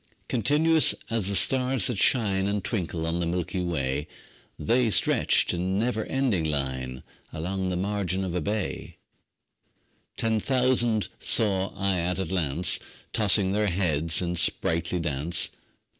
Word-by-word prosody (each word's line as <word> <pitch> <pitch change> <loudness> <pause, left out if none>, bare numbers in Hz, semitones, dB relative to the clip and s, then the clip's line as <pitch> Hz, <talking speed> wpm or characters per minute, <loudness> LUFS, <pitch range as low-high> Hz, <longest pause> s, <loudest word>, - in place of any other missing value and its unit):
Continuous 150 +6 +3 0.2
as 115 -4 0
the 100 - -1
stars 130 -2 +2
that 115 -6 0
shine 100 -6 +2
And 100 -1 -2
twinkle 85 -7 -3
on 85 +1 -1
the 85 - -1
milky 90 +1 -2
way, 75 -4 -2 0.5
The 120 +1 +1
stretched - - +2
in 90 +2 -1
never 110 0 -1
ending 130 -11 0
line 65 -4 -3 0.3
Along 95 +4 -3
the 90 - -2
margin 95 0 -1
of 90 - -4
a 90 - -1
bay: 105 +4 -4 1.2
Ten 110 -1 0
thousand 125 -3 +1
saw 100 -4 +2
I 95 -2 0
at 90 +1 -1
a 95 - -2
glance, 85 -2 +1 0.3
Tossing 100 -3 +3
their 105 +1 +1
heads 85 -3 0
in 85 0 -2
sprightly 85 +1 +1
dance. 80 +1 -1
95 Hz, 140 wpm, -26 LUFS, 85-110 Hz, 1.2 s, Continuous